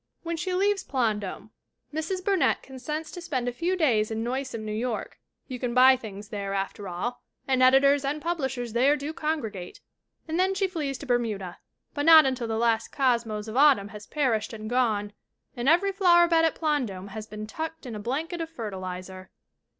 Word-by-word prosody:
When 335 0 -2
she 345 +3 -3
leaves 395 +1 +1
Plandome 215 -5 -2 0.4
Mrs. 365 +4 -3
Burnett 390 -3 +2
consents 300 +4 -6
to 355 - -8
spend 260 -7 -2
a - - +1
few 345 +8 -1
days 235 -11 +2
in 220 0 -3
noisome 245 -2 -3
New 215 - -4
York 230 +2 -3 0.3
you 255 -2 -6
can 245 -1 -2
buy 260 +1 +8
things 210 -4 -9
there, 200 -3 -3
after 195 +1 -3
all, 235 +8 -4 0.3
and 260 -1 +2
editors 270 +2 +5
and 285 +2 -1
publishers 265 -8 -3
there 265 +5 +4
do 290 +2 -5
congregate 225 - -4 0.5
and 325 +2 -2
then 380 +1 +2
she 390 0 +1
flees 305 -8 -3
to 285 - -9
Bermuda. 220 -8 -1 0.3
But 290 +1 -2
not 320 -2 +9
until 255 -3 -1
the 225 -1 -2
last 230 -1 +1
cosmos 235 -5 0
of 220 - -6
autumn 270 -8 +5
has 210 -1 -10
perished 245 -8 0
and 215 -1 -7
gone 215 -4 0 0.4
and 245 +3 +1
every 360 +5 +4
flowerbed 345 -3 +5
at 325 -1 +3
Plandome 245 - -2
has 215 +2 -7
been 215 0 -7
"tucked 320 +7 -6
in 245 - -6
a 210 - -5
blanket 310 - -3
of 325 - -4
fertilizer." 185 - -7
255 Hz, 185 wpm, -27 LUFS, 215-315 Hz, 0.5 s, not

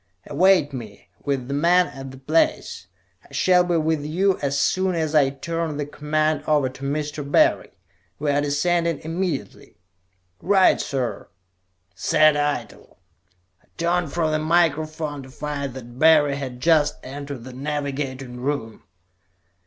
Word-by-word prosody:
Await 165 -1 +3
me, 110 -8 -9
with 135 -3 -2
the 140 - -3
men, 175 +5 +4
at 135 -5 -9
that 130 0 -14
place. 155 - 0 0.4
I - - -22
shall 180 -1 +3
be 175 -1 0
with 160 -1 0
you 185 +6 +1
as 140 0 -1
soon 185 -1 +1
as 160 -2 -1
I 145 -3 +4
turn 160 +2 -4
the 145 - -2
command 155 +1 -1
over 145 -4 +2
to 130 +2 -12
Mr. 145 +1 -3
Barry. - - +3 0.5
We 150 -1 0
are 145 +1 +2
descending 165 +3 0
immediately." 165 - -4 0.6
"Right, 190 +2 +4
sir!" 130 -3 -3 0.7
said 155 +11 +3
Eitel. 145 0 -3 0.6
I - - -32
turned 170 -2 0
from 160 -1 0
the 155 - +1
microphone 155 -2 0
to 130 - -12
find 140 -1 -5
that 120 -1 -10
Barry 155 -3 +5
had 130 -3 -6
just 155 0 +3
entered 140 -1 -7
the 130 +1 -10
navigating 135 -2 -4
room. 130 -5 -3
145 Hz, 145 wpm, -23 LUFS, 135-160 Hz, 0.7 s, Barry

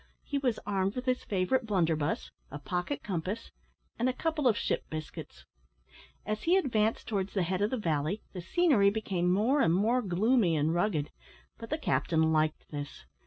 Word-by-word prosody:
He 285 - -2
was 250 -5 0
armed 195 0 0
with 250 0 -4
his 255 -1 0
favourite 215 +6 0
blunderbuss, 165 -6 0 0.2
a 145 - -6
pocket 180 - -3
compass, 190 +4 -4 0.5
and 245 +2 +2
a - - 0
couple 315 0 0
of 225 -3 +3
ship - - -2
biscuits. 155 -1 -7 0.8
As 215 0 -2
he 350 +3 +4
advanced 225 - +1
towards 200 -2 -2
the 190 - +2
head 185 +2 -1
of 205 - +2
the 255 - -1
valley, 165 0 -1
the 180 - -5
scenery 255 - +4
became 190 -4 0
more 235 +10 +3
and 165 +1 +3
more 230 +6 +2
gloomy 200 -1 +2
and 155 +2 +1
rugged, 175 -5 0 0.5
but 230 - -8
the 310 - 0
captain 160 - +1
liked 155 0 +1
this. 145 -2 -7
200 Hz, 175 wpm, -30 LUFS, 170-245 Hz, 0.8 s, he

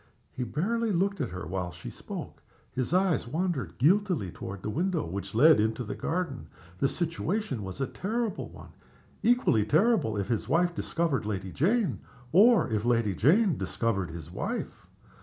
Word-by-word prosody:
He 125 - -4
barely 220 - -1
looked 195 0 0
at 125 - -1
her 90 -1 -6
while 90 +1 -3
she - - -9
spoke. - - -8 0.3
His 130 +2 -2
eyes 180 -9 +2
wandered 160 0 -2
guiltily 175 - +2
toward 95 +2 -7
the - - -2
window 175 - 0
which 95 +4 -6
led 150 +4 +7
into 110 +3 0
the 105 - -5
garden. 165 -6 -3 0.3
The 135 - +3
situation 170 - -2
was 95 +5 -7
a 135 - +1
terrible 220 - -3
one - - -13 0.5
equally 235 - +3
terrible 155 - +2
if 100 -1 -2
his 115 +1 -2
wife 175 +4 +2
discovered 160 -11 -1
Lady 95 -3 -3
Jane, 205 - +1 0.3
or 220 +6 +6
if 110 -3 -1
Lady 115 -4 +2
Jane 170 - +3
discovered 100 -7 -1
his 80 0 -8
wife. - - -4
135 Hz, 160 wpm, -28 LUFS, -, 0.5 s, led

